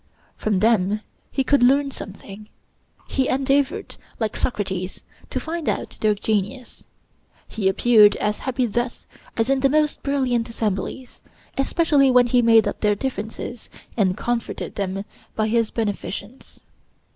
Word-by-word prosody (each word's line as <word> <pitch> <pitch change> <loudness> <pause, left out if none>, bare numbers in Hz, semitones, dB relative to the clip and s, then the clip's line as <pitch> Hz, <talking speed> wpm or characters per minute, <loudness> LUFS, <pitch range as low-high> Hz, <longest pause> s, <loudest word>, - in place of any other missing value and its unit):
From 205 -4 0
them 215 -2 +2 0.3
he 270 - 0
could 285 0 +3
learn 275 +3 +4
something; 205 -1 -9 0.6
he 265 -1 0
endeavored, 275 +2 0 0.2
like 220 -2 -1
Socrates, 190 -5 -3 0.3
to - - -2
find 330 0 -3
out - - -3
their 215 -1 +3
genius; 210 +4 -3 0.6
he 195 -3 0
appeared 210 0 +6
as 210 0 -1
happy 255 -1 -1
thus 240 +2 -3 0.3
as 225 0 +2
in 270 0 +2
the 275 +1 +3
most 300 +1 +1
brilliant 255 -4 0
assemblies, 225 +3 -4 0.3
especially 280 -1 +3
when 250 -1 +6
he 245 +1 +3
made 225 -1 +5
up - - -3
their 210 -1 +3
differences, 225 0 -5 0.3
and 195 -4 +1
comforted 240 0 -3
them 195 0 -3 0.3
by 215 0 +1
his 230 0 +1
beneficence. 215 +1 -5
230 Hz, 135 wpm, -22 LUFS, 210-265 Hz, 0.6 s, appeared